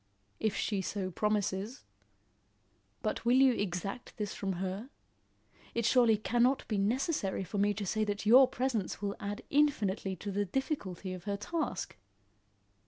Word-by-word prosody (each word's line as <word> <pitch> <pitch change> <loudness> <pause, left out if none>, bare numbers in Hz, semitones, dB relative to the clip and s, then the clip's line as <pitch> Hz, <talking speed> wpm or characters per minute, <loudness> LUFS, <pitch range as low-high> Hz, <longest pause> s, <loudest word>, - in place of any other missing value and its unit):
"If 215 -2 0
she 200 -3 0
so 190 0 -3
promises. 210 +3 -1 1.2
But 215 - -1
will 240 +2 +4
you 265 -1 +6
exact 195 +2 -4
this 210 -3 -3
from 195 -1 -2
her? 190 +6 -4 0.9
It 235 -1 0
surely 235 -2 +5
cannot 240 +5 +2
be 210 -3 0
necessary 215 - 0
for 195 +3 -4
me 205 +1 +2
to 205 0 -3
say 215 +3 0
that 205 0 -3
your 255 +5 +8
presence 245 -7 -2
will 200 0 -2
add 205 +3 -4
infinitely 215 -10 +2
to 200 +3 -5
the 205 +1 0
difficulty 195 - -3
of 185 0 -8
her 200 -1 -1
task." 285 - -3
205 Hz, 150 wpm, -32 LUFS, 195-240 Hz, 1.2 s, your